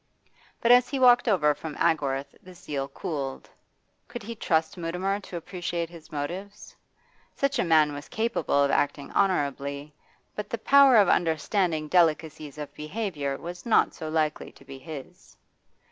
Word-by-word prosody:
But 235 - +4
as 245 0 +6
he 275 - -2
walked 245 -1 +5
over 155 -9 +3
from 150 0 -8
Agworth 140 -3 0
this 180 -1 -15
zeal 140 -2 -3
cooled. 140 -1 -5 0.6
Could 240 - -8
he 230 +3 -6
trust 160 -7 0
Mutimer 180 +3 -2
to 185 -3 -8
appreciate 175 -1 -4
his 165 -2 -14
motive? 175 +8 -4 0.8
Such 275 -2 0
a - - +3
man 155 -4 +4
was 145 +1 -8
capable 220 -10 0
of 140 - +1
acting 140 -1 -1
honourably, 140 -5 -1 0.4
but 210 0 -5
the 230 - -2
power 275 +2 +6
of 205 -3 +6
understanding 165 -1 +1
delicacies 155 -3 +1
of 145 -1 -7
behaviour 150 -5 -4
was 175 +1 -8
not 230 - +3
so 155 - -6
likely 155 -1 -1
to 135 - -19
be 135 0 -10
his. 150 -2 -11
165 Hz, 155 wpm, -26 LUFS, 145-200 Hz, 0.8 s, as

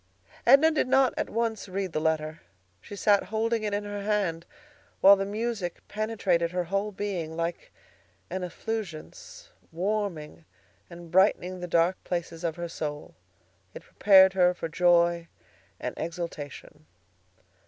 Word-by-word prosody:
Edna 315 +4 +7
did 310 - 0
not 265 -1 +3
at - - -2
once 225 -3 -2
read 190 -1 -3
the 155 - -2
letter. 155 0 -1 0.4
She 205 - -10
sat 200 0 +3
holding 220 +3 -1
it 210 -1 -2
in 205 0 -1
her 205 0 -5
hand, 195 -5 -1 0.5
while 200 +1 +8
the 195 0 -3
music 215 -4 -4
penetrated 205 -6 0
her 180 +1 -2
whole 195 +4 -2
being 185 -6 -4
like 170 0 -4 0.6
an 185 +1 -4
effulgence, 225 - -7 0.2
warming 175 -4 -3 0.4
and 170 -1 -11
brightening 185 -1 +2
the 180 - -5
dark 170 +2 +1
places 170 -1 -4
of 165 -2 -1
her 170 0 -5
soul. 150 -3 -6 0.6
It - - -9
prepared 190 -2 +5
her 180 -1 +3
for 165 - -4
joy 170 0 +3 0.5
and - - -4
exultation. 160 -3 -7
185 Hz, 140 wpm, -27 LUFS, 170-210 Hz, 0.6 s, while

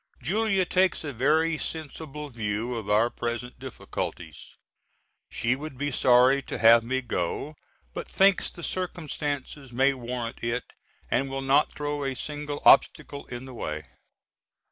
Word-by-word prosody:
Julia 195 0 +1
takes 185 -1 +2
a 145 -2 -4
very 155 +6 +2
sensible 150 -2 -5
view 110 +1 -2
of 110 -3 -5
our 110 +3 +3
present 120 +1 -4
difficulties. 130 -1 -6 0.7
She 120 +2 0
would 145 -1 -8
be 145 +2 -2
sorry 125 +2 +5
to - - -5
have 115 0 +7
me 130 +3 -1
go, 120 - -3 0.4
but - - -5
thinks 195 0 +3
the 170 - -11
circumstances 150 -7 -4
may 135 +3 +3
warrant 120 -2 -5
it 120 +1 -1 0.5
and 135 +3 +1
will 135 0 -3
not 140 +3 +3
throw 145 -1 -3
a 135 -1 -2
single 145 +2 -5
obstacle 140 -1 +4
in 120 +1 -7
the 130 - -10
way. 75 -9 -4
135 Hz, 145 wpm, -27 LUFS, 120-150 Hz, 0.7 s, have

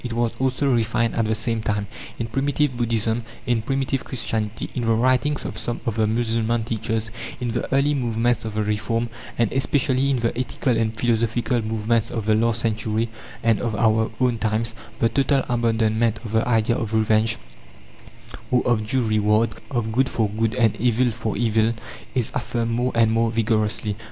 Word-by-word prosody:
It 120 -2 -4
was 120 0 0
also 135 +1 +1
refined 115 0 +1
at 115 - +1
the 110 - +1
same 110 0 -1
time. 105 -1 -1 0.3
In 115 - -2
primitive 135 +3 0
Buddhism, 115 -1 0 0.2
in 120 -2 +1
primitive 135 +2 -1
Christianity, 110 -4 -3
in 120 -3 -2
the 115 - +3
writings 130 +5 +2
of - - -4
some 120 - -3
of 115 - -1
the 110 -1 +2
Mussulman 115 0 0
teachers, 110 -1 -2 0.3
in 120 -2 -2
the 120 - -3
early 140 +2 +3
movements 120 -3 0
of 110 -1 -5
the 110 - +1
Reform, 110 +3 -1 0.3
and 115 -3 +2
especially 135 0 +1
in 135 - +2
the 115 0 0
ethical 125 0 -1
and 110 0 0
philosophical 115 +1 +1
movements 110 +1 0
of 115 -3 -3
the 110 - +3
last 115 +1 +2
century 110 0 -1 0.3
and 115 -2 +3
of 115 -3 -1
our 110 0 +2
own 125 -3 +2
times, 110 +1 0 0.2
the 115 - +3
total 135 +2 +2
abandonment 115 -1 +1
of 110 - -5
the 110 +1 +1
idea 115 -1 +2
of 110 -1 -2
revenge, 110 0 +2 1.1
or 125 - +2
of 110 -3 +1
"due 130 +2 +1
reward" 110 +1 +2 0.2
of 120 -4 -1
good 130 +3 +2
for 110 -2 +1
good 110 +2 -1
and 115 -4 +3
evil 125 +1 +2
for 110 -2 -3
evil 110 0 +2 0.4
is 120 -3 0
affirmed 120 -2 -2
more 125 +2 0
and 115 -1 +4
more 115 0 +2
vigorously. 110 -2 0
115 Hz, 180 wpm, -23 LUFS, 110-120 Hz, 1.1 s, and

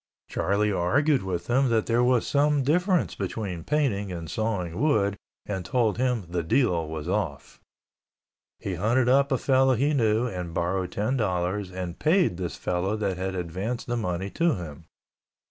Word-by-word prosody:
Charlie 100 +4 0
argued 130 - +2
with 90 -2 -3
him 130 +2 +2
that 115 -2 +2
there 120 +1 +2
was 125 -1 +3
some 145 0 +2
difference 180 +5 +2
between 95 -3 -4
painting 115 - 0
and 85 -2 -6
sawing 95 -6 -2
wood 105 -10 +2 0.3
and 95 -3 -3
told 115 +2 0
him 125 -6 0
the 85 0 -2
deal 85 - +1
was 80 0 -5
off. 90 -7 -3 1.0
He 95 - -4
hunted 115 +8 +1
up 140 +2 +4
a 130 - +3
fellow 130 0 +3
he 140 +6 +1
knew 115 -3 +2
and 90 -7 -5
borrowed 90 +1 -1
ten 110 +6 0
dollars 95 -2 -1
and 90 -2 -5
paid 160 - +3
this 90 -2 -4
fellow 90 +4 -1
that 100 -4 -1
had 95 +1 -3
advanced 95 +8 -3
the 120 - -2
money 95 -3 -2
to 170 -1 +2
him. 80 -3 -8
105 Hz, 165 wpm, -26 LUFS, 90-125 Hz, 1.0 s, up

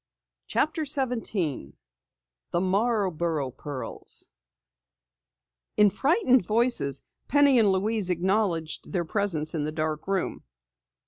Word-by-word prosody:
CHAPTER 310 +1 0
17 225 - -2 0.7
THE 170 - 0
MARBOROUGH 185 - 0
PEARLS 135 +1 -8 1.5
In 210 -1 +6
frightened 270 - +3
voices 215 - +1 0.2
Penny 285 -3 +5
and 210 -3 +4
Louise 200 +1 0
acknowledged 180 -2 0
their 175 -3 0
presence 160 -5 -1
in 160 - -1
the 150 +1 -2
dark 155 0 -3
room. 195 -2 -2
190 Hz, 100 wpm, -26 LUFS, 160-230 Hz, 1.5 s, In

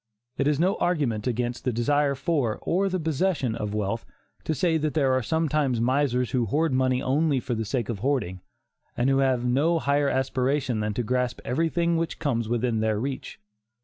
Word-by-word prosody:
It 140 - 0
is 150 -1 +1
no 185 +4 +2
argument 135 -11 0
against 120 0 -2
the 125 - 0
desire 140 +5 +1
for, 135 -5 0
or 195 +3 +1
the 185 0 -1
possession 160 -5 0
of 105 -1 -4
wealth, 105 +2 -2 0.4
to 155 - 0
say 165 +1 +2
that 155 0 -2
there 135 -4 +3
are 130 - +2
sometimes 150 -1 0
misers 125 0 +1
who 120 -3 +1
hoard 155 +5 +1
money 130 0 +1
only 145 +1 +2
for 125 0 -3
the 110 -1 -2
sake 115 0 -2
of 110 -4 -4
hoarding, 115 -8 -1 0.6
and 125 +3 +2
who 135 - +3
have 130 -3 +1
no 145 +7 +2
higher 145 -2 +1
aspiration 130 -2 0
than 105 -1 -2
to 120 - -1
grasp 125 +1 -1
everything 165 +4 +1
which 165 0 -2
comes 115 -7 -1
within 120 -1 0
their 110 -1 0
reach. 135 +3 -5
130 Hz, 190 wpm, -26 LUFS, 120-150 Hz, 0.6 s, there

